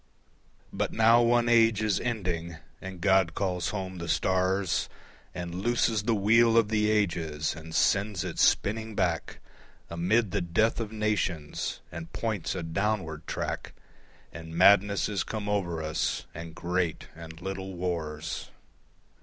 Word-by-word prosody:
But -, -, -1 dB
now 115 Hz, +2 st, +5 dB
one 120 Hz, 0 st, +3 dB
age 115 Hz, -2 st, +4 dB
is 105 Hz, -3 st, +1 dB
ending, 90 Hz, -8 st, -3 dB, 0.2 s
and 95 Hz, -2 st, -8 dB
God 95 Hz, -3 st, +3 dB
calls 90 Hz, -3 st, -1 dB
home 95 Hz, -3 st, -5 dB
the 85 Hz, 0 st, -5 dB
stars 95 Hz, 0 st, +1 dB, 0.5 s
And 85 Hz, -1 st, -5 dB
looses 115 Hz, -1 st, +1 dB
the 110 Hz, +2 st, +1 dB
wheel 115 Hz, +3 st, +4 dB
of 110 Hz, -2 st, +4 dB
the 105 Hz, -1 st, +2 dB
ages 85 Hz, -8 st, 0 dB
and 80 Hz, 0 st, -9 dB
sends 100 Hz, -3 st, +2 dB
it -, -, -5 dB
spinning 110 Hz, +1 st, +2 dB
back 85 Hz, -5 st, -1 dB, 0.5 s
Amid 95 Hz, +5 st, +1 dB
the 100 Hz, -, 0 dB
death 90 Hz, +8 st, +1 dB
of 110 Hz, -2 st, -4 dB
nations, 105 Hz, -8 st, -2 dB
and 85 Hz, 0 st, -8 dB
points 110 Hz, -7 st, -2 dB
a 90 Hz, -, -3 dB
downward 80 Hz, -3 st, -2 dB
track, -, -, -4 dB, 0.6 s
And 80 Hz, 0 st, -8 dB
madness 100 Hz, +2 st, +5 dB
is 105 Hz, -2 st, -1 dB
come 105 Hz, -2 st, -5 dB
over 85 Hz, -6 st, -1 dB
us 80 Hz, 0 st, -1 dB
and 85 Hz, 0 st, -8 dB
great 90 Hz, -1 st, -2 dB
and 80 Hz, 0 st, -10 dB
little 95 Hz, +1 st, -5 dB
wars. 80 Hz, -3 st, -4 dB
95 Hz, 140 wpm, -28 LUFS, 85-110 Hz, 0.6 s, now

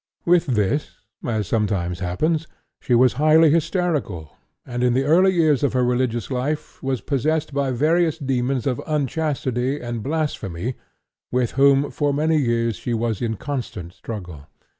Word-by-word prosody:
With 175 Hz, -1 st, +3 dB
this, 125 Hz, +4 st, 0 dB, 0.3 s
as 110 Hz, -3 st, -1 dB
sometimes 95 Hz, -6 st, -1 dB
happens, 155 Hz, -, -1 dB, 0.3 s
she 125 Hz, -, +1 dB
was 125 Hz, +1 st, +5 dB
highly 155 Hz, 0 st, +6 dB
hysterical, 155 Hz, -, -1 dB, 0.3 s
and 120 Hz, -1 st, -4 dB
in 125 Hz, -1 st, +3 dB
the 135 Hz, -, +2 dB
early 175 Hz, +7 st, +4 dB
years 160 Hz, -6 st, +3 dB
of 140 Hz, -3 st, +1 dB
her 125 Hz, -1 st, +2 dB
religious 125 Hz, -1 st, -1 dB
life 135 Hz, +4 st, -3 dB
was 130 Hz, -3 st, -2 dB
possessed 150 Hz, +2 st, -1 dB
by 140 Hz, -1 st, 0 dB
various 160 Hz, +5 st, +2 dB
demons 130 Hz, -3 st, -1 dB
of 125 Hz, -3 st, -1 dB
unchastity 140 Hz, -3 st, -1 dB
and 120 Hz, -2 st, -4 dB
blasphemy 130 Hz, -, -2 dB, 0.6 s
with 125 Hz, -2 st, +1 dB
whom 140 Hz, +1 st, +4 dB
for 145 Hz, -3 st, 0 dB
many 155 Hz, +2 st, +2 dB
years 115 Hz, -5 st, 0 dB
she 120 Hz, +5 st, -2 dB
was 115 Hz, -2 st, -1 dB
in 110 Hz, -3 st, -1 dB
constant 110 Hz, -11 st, -5 dB
struggle. 90 Hz, -12 st, -8 dB
130 Hz, 150 wpm, -22 LUFS, 115-150 Hz, 0.6 s, highly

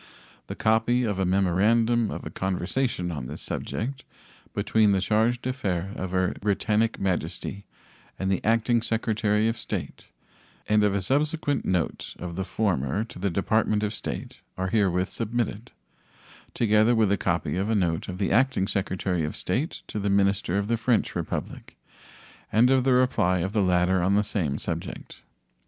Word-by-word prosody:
The -, -, -5 dB
copy 115 Hz, +3 st, +2 dB
of 105 Hz, -5 st, -1 dB
a 95 Hz, -, +1 dB
memorandum 105 Hz, +5 st, +2 dB
of -, -, -6 dB
a -, -, -6 dB
conversation 95 Hz, +1 st, -1 dB
on 70 Hz, -6 st, -5 dB
this -, -, -7 dB
subject 130 Hz, +4 st, -4 dB, 0.5 s
between 110 Hz, -2 st, +3 dB
the 95 Hz, -, +2 dB
charge 110 Hz, +5 st, +2 dB
d'affaires 100 Hz, -7 st, -2 dB
of 95 Hz, -, -4 dB
Her 90 Hz, 0 st, +1 dB
Britannic 105 Hz, +2 st, +1 dB
Majesty 95 Hz, +1 st, -3 dB, 0.5 s
and 95 Hz, 0 st, -1 dB
the 95 Hz, -, 0 dB
Acting 115 Hz, +1 st, +2 dB
Secretary 110 Hz, -2 st, +1 dB
of 115 Hz, -, 0 dB
State -, -, -5 dB, 0.6 s
and 105 Hz, 0 st, +3 dB
of 100 Hz, -1 st, +2 dB
a 100 Hz, -, 0 dB
subsequent 145 Hz, -, 0 dB
note 90 Hz, -4 st, -1 dB
of 85 Hz, -1 st, -6 dB
the 95 Hz, -, -2 dB
former 95 Hz, -4 st, 0 dB
to 115 Hz, -, -11 dB
the 100 Hz, +2 st, 0 dB
Department 105 Hz, +3 st, +1 dB
of 105 Hz, 0 st, -1 dB
State -, -, -6 dB, 0.2 s
are 95 Hz, 0 st, -1 dB
herewith 95 Hz, -3 st, +2 dB
submitted, 115 Hz, 0 st, -3 dB, 0.9 s
together 110 Hz, +1 st, +4 dB
with 110 Hz, -3 st, +3 dB
a -, -, +4 dB
copy 85 Hz, -3 st, -1 dB
of 95 Hz, +4 st, -1 dB
a 110 Hz, -, +2 dB
note 85 Hz, -5 st, 0 dB
of 90 Hz, -, -5 dB
the 95 Hz, -1 st, -1 dB
Acting 130 Hz, -6 st, +2 dB
Secretary 95 Hz, -3 st, -1 dB
of 75 Hz, -, -3 dB
State 130 Hz, -, -2 dB
to 105 Hz, -, -5 dB
the 100 Hz, 0 st, -1 dB
minister 100 Hz, -1 st, +2 dB
of 100 Hz, 0 st, -1 dB
the 115 Hz, +1 st, +1 dB
French 115 Hz, 0 st, +1 dB
Republic -, -, -5 dB, 0.7 s
and 120 Hz, +5 st, +4 dB
of 130 Hz, -1 st, +3 dB
the 130 Hz, -, +4 dB
reply 125 Hz, -8 st, +3 dB
of 95 Hz, +4 st, -2 dB
the 105 Hz, -, +2 dB
latter 90 Hz, 0 st, +2 dB
on 95 Hz, +3 st, +2 dB
the 105 Hz, -, +3 dB
same 80 Hz, -9 st, -1 dB
subject. -, -, -6 dB
105 Hz, 170 wpm, -26 LUFS, 95-115 Hz, 0.9 s, together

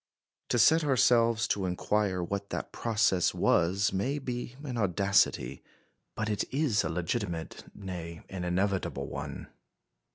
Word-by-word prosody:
To -, -, +2 dB
set 155 Hz, +8 st, +5 dB
ourselves 115 Hz, -5 st, +3 dB
to 95 Hz, -2 st, 0 dB
inquire 95 Hz, 0 st, 0 dB
what 100 Hz, +3 st, -4 dB
that -, -, -4 dB
process 110 Hz, -6 st, +1 dB
was 95 Hz, +4 st, +2 dB
may 125 Hz, +10 st, 0 dB
be 125 Hz, -2 st, -5 dB
an 130 Hz, -4 st, -4 dB
audacity, 100 Hz, -, +1 dB, 0.5 s
but 110 Hz, -, -2 dB
it 105 Hz, -2 st, 0 dB
is 135 Hz, -7 st, +1 dB
a 80 Hz, -, -2 dB
legitimate, 85 Hz, -1 st, -3 dB
nay, 85 Hz, -4 st, -7 dB
an 95 Hz, -2 st, -6 dB
inevitable 95 Hz, +2 st, -1 dB
one. -, -, -6 dB
100 Hz, 130 wpm, -29 LUFS, 90-115 Hz, 0.5 s, set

